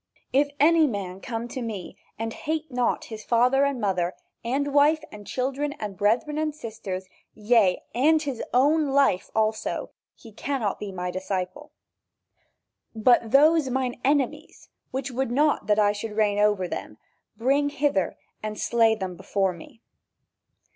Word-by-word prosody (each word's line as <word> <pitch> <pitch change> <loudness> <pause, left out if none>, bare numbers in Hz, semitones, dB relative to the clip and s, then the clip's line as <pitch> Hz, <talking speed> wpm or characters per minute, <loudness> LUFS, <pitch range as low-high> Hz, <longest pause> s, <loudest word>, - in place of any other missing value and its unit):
"If 285 +2 +3
any 320 +2 +5
man 195 -5 -5
come 235 -2 -4
to 255 - -5
me 215 -6 -6 0.2
and 225 0 -3
hate 315 0 -3
not 245 -1 0
his 220 -2 -8
father 250 +4 +3
and 280 -3 -1
mother, 185 -4 0 0.3
and 275 +4 -1
wife, 295 +2 +4
and 205 -1 -11
children 275 +3 -2
and 210 -6 -6
brethren 230 +10 +1
and 310 -1 -1
sisters, 210 -8 -6 0.3
yea, 210 -4 +3
and 300 +7 +4
his 280 -6 -4
own 295 +5 +3
life 275 -9 +2
also, 220 0 -1 0.2
he 225 - -14
cannot 230 -1 -2
be 205 -1 -5
my 180 -1 -4
disciple." 190 +9 -4 1.2
"But 230 +1 +4
those 300 +3 +5
mine 255 -1 -2
enemies, 275 -2 -1 0.2
which 265 0 -4
would 260 0 -1
not 285 -3 +1
that 210 -1 +3
I 205 -1 +4
should 210 +1 -6
reign 205 -2 +2
over 205 -3 +2
them, - - -6 0.4
bring 275 +5 +2
hither 285 -9 0 0.2
and 215 -1 -5
slay 225 -1 +3
them 190 -4 -5
before 195 +1 -1
me." 175 +6 -14
235 Hz, 150 wpm, -25 LUFS, 205-280 Hz, 1.2 s, any